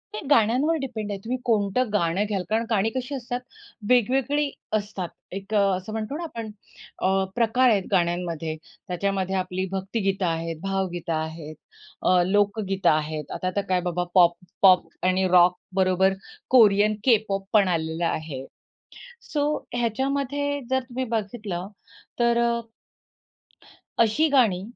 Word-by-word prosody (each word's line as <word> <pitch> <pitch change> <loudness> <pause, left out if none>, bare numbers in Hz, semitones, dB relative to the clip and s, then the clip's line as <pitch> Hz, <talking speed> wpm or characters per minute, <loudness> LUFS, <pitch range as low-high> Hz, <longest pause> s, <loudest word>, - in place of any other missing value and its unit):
हे - - -3
गाण्यांवर 255 +6 +3
डिपेंड 220 -6 -4
आहे, 200 - -4
तुम्ही 240 +6 -3
कोणतं 220 +1 +1
गाणं 185 0 +1
घ्याल 200 -3 -2
कारण 225 +1 +1
गाणी 220 -1 +2
कशी 260 +2 -3
असतात 245 -1 -4 0.5
वेगवेगळी 270 +4 +2 0.3
असतात. 200 -3 -5 0.2
एक 195 +3 -7
अ, - - +5 0.2
असं 185 +3 -8
म्हणतो 220 +6 -3
ना 340 - -5
आपण 230 -9 -6 0.5
अ, 190 +1 +2
प्रकार 240 +2 +3
आहेत 205 -4 +2
गाण्यांमध्ये 170 -3 0 0.3
त्याच्यामध्ये 190 +1 -1
आपली 185 0 -2
भक्तिगीतं 195 0 -1
आहेत, 165 -1 -2
भावगीतं 190 -4 -2
आहेत, 160 0 -4 0.5
अ, 180 -1 +4
लोकगीतं 195 -1 +1
आहेत, 155 -1 -1
आता 185 - -2
तर 200 - +2
काय 185 -1 +2
बाबा 175 +1 -1
पॉप, 175 -2 +6 0.3
पॉप 185 -3 +6 0.2
आणि 185 +1 +2
रॉकबरोबर 185 +1 +3 0.4
कोरियन 215 -3 +5
के-पॉप 215 -5 +2
पण 205 -3 +5
आलेलं 165 -1 -1
आहे. 155 -5 -3 0.8
सो 290 -1 -1 0.3
ह्याच्यामध्ये 275 +4 -1
जर 260 0 +2
तुम्ही 255 +1 -4
बघितलं 205 -4 -3 0.5
तर 235 0 +3
अ 235 0 +1 1.4
अशी 230 +8 +4
गाणी 230 -10 +3
200 Hz, 135 wpm, -25 LUFS, 180-235 Hz, 1.4 s, पॉप